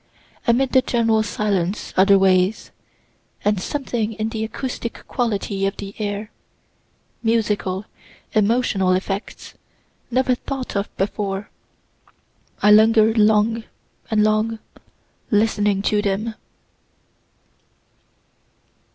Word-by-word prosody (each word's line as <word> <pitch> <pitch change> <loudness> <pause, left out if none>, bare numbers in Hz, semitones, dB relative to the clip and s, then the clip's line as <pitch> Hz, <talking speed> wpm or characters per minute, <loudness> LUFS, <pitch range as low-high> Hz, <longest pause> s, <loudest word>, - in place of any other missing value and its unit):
amid 250 +3 +3
the 260 - +5
general 230 -3 +2
silence 205 -3 -2
otherways, 190 0 +3 0.7
and 205 -2 +2
something 235 -4 -2
in 220 +1 -3
the 220 -1 -3
acoustic 235 +1 -5
quality 205 -5 -2
of 195 - -4
the 200 -1 -7
air, 210 +1 -3 0.9
musical, 210 -4 0 0.5
emotional 210 -3 +2
effects, 195 +3 -4 0.6
never 255 +1 +2
thought 260 0 -5
of 200 +1 -1
before. 195 0 -3 1.1
I 210 - +6
linger'd 220 +1 +5
long 215 +2 +3 0.5
and 215 -1 +3
long, 215 +1 +1 0.7
listening 210 -2 +2
to 210 0 +2
them. 210 +2 -1
215 Hz, 90 wpm, -21 LUFS, 200-225 Hz, 1.1 s, I